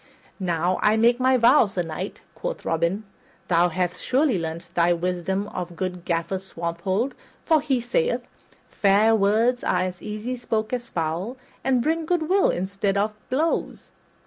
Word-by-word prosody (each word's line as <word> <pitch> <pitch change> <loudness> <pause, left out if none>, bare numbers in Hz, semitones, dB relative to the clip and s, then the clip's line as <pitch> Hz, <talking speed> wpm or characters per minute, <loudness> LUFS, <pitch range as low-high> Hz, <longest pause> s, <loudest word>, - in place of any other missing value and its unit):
"Now, 175 -1 0
I 210 +1 +4
make 235 +2 +4
my 260 0 +4
vow, 235 -2 +6
Sir 190 -3 -2
Knight," 165 +4 -6
quoth - - -5
Robin, 170 +6 0 0.5
"thou 175 0 +4
hast 180 +1 -2
surely 260 - +2
learned 165 +1 -5
thy 175 0 +3
wisdom 180 +3 -1
of 175 -1 -5
good 180 0 -4
Gaffer 170 +2 -1
Swanthold, 185 +6 -2 0.3
for 315 -2 +4
he 275 -4 +1
sayeth, 475 - 0 0.4
'Fair 205 +2 +3
words 225 +4 +2
are 180 - +1
as 185 0 -3
easy 215 +4 -4
spoke 225 -2 -2
as 245 -1 -3
foul, 170 +9 -2 0.3
and 255 -3 +2
bring 320 +2 0
good 340 -3 +1
will 385 +2 +4
in 175 - -1
the 190 - -5
stead 200 0 0
of 210 +2 +1 0.2
blows.' 310 +6 -1
200 Hz, 165 wpm, -24 LUFS, 180-245 Hz, 0.5 s, vow